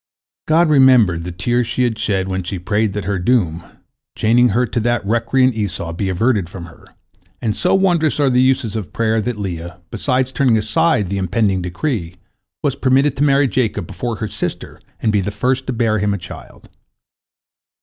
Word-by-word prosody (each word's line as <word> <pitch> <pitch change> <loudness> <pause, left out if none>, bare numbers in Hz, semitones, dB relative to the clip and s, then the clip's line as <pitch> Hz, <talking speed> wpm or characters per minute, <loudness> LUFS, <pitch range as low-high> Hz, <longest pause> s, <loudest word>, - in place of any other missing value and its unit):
" - - -97
God 165 +2 +4
remembered 125 - +4
the 90 - -5
tears 120 +7 -1
she 125 +2 -1
had 115 -3 -1
shed 95 -2 -1
when 95 0 -2
she 95 +2 -5
prayed 105 +3 -1
that 105 -3 -4
her 100 -1 -1
doom, 90 -6 +1 0.6
chaining 120 +3 +3
her 120 +5 +1
to 120 - -2
that 120 -1 0
recreant 115 +4 +2
Esau, 100 -6 -4
be 95 +3 -2
averted 100 -1 0
from 85 -1 -8
her, 85 - -16 0.5
and 105 -3 -1
so - - +2
wondrous 175 -6 +2
are 140 -2 +3
the 125 0 +3
uses 130 -4 +1
of 105 -5 -5
prayer 110 -1 +1
that 120 +1 -3
Leah, 85 -3 -6
besides 130 -1 0
turning 130 -4 +2
aside 110 - +1
the 100 - -1
impending 95 0 0
decree, 90 - -3 0.5
was 140 -2 0
permitted 135 +2 +2
to 140 - +1
marry 140 -1 +3
Jacob 120 -8 -1
before 120 +7 -4
her 110 - -4
sister - - -5 0.2
and 110 - +2
be 105 -1 +2
the 95 - -3
first 130 +5 -1
to - - -1
bear 115 -3 0
him 100 0 0
a - - -3
child. 90 - -12
110 Hz, 190 wpm, -18 LUFS, 95-130 Hz, 0.6 s, God